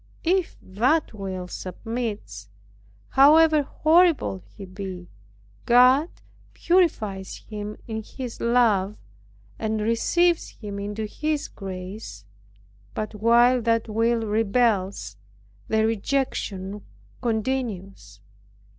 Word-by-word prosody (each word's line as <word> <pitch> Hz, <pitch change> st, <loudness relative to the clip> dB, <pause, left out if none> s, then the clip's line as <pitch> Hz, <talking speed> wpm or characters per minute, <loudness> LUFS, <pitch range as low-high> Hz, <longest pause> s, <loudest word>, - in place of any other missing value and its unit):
If 360 Hz, +1 st, 0 dB
that 245 Hz, +13 st, +1 dB
will 190 Hz, -3 st, -5 dB
submits, 190 Hz, -, -5 dB, 0.6 s
how 280 Hz, +4 st, +7 dB
horrible 310 Hz, -, +3 dB
soever -, -, -25 dB
he 200 Hz, -, -8 dB
be, 185 Hz, -2 st, -8 dB, 0.6 s
God 255 Hz, +6 st, +6 dB, 0.5 s
purifies 220 Hz, -, +1 dB
him 210 Hz, -1 st, -6 dB
in 220 Hz, -1 st, -4 dB
his 245 Hz, +2 st, -8 dB
love, 220 Hz, -4 st, +2 dB, 0.6 s
and 220 Hz, 0 st, -1 dB
receives 330 Hz, +11 st, +1 dB
him 205 Hz, -2 st, -6 dB
into 205 Hz, +2 st, -4 dB
his 300 Hz, +7 st, -2 dB
grace; 185 Hz, -, -8 dB, 0.7 s
but 215 Hz, -, -3 dB
while 235 Hz, +4 st, +4 dB
that 230 Hz, 0 st, +1 dB
will 225 Hz, +1 st, +1 dB
rebels, 210 Hz, -, 0 dB, 0.5 s
the 220 Hz, 0 st, +2 dB
rejection 210 Hz, -4 st, -2 dB, 0.4 s
continues. 220 Hz, -5 st, -3 dB
220 Hz, 95 wpm, -24 LUFS, 195-250 Hz, 0.7 s, how